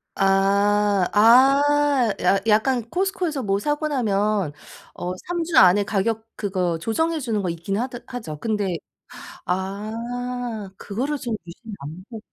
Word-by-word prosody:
아. 200 0 +3
아. 270 +2 +5
야 195 - +3
약간 230 +3 +3
코스트코에서 360 - -1
뭐 195 -1 0
사고 295 +4 -1
나면 210 - 0 0.4
어 180 - -4 0.2
3주 345 -1 -1
안에 190 +2 +7
가격 220 +2 -1
그거 185 -4 -1
조정해 320 - 0
주는 230 -6 -1
거 185 - -2
있긴 170 +4 -3
하더 245 0 -3
하죠. 220 -12 -6
근데 205 -5 -1 0.7
아. 220 +4 -4
그거를 260 +9 -3
좀 240 -5 -3
유심히 210 +6 -11
안보 185 - -9
215 Hz, 235 characters per minute, -23 LUFS, 195-255 Hz, 0.7 s, 안에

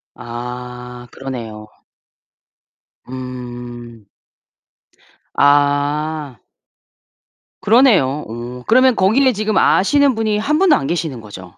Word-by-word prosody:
아 125 +1 -8
그러네요. 115 -5 -7 1.4
음. 120 -3 -9 1.3
아. 145 0 +1 1.2
그러네요. 190 - +3
어 120 +2 -8
그러면 255 +2 +4
거기에 250 +8 +3
지금 215 -1 -1
아시는 280 +6 +3
분이 220 -1 0
한 295 +9 0
분도 380 -5 +5
안 135 - -2
계시는 160 -8 -3
거죠? 95 -4 -12
135 Hz, 175 characters per minute, -18 LUFS, -, 1.4 s, 분도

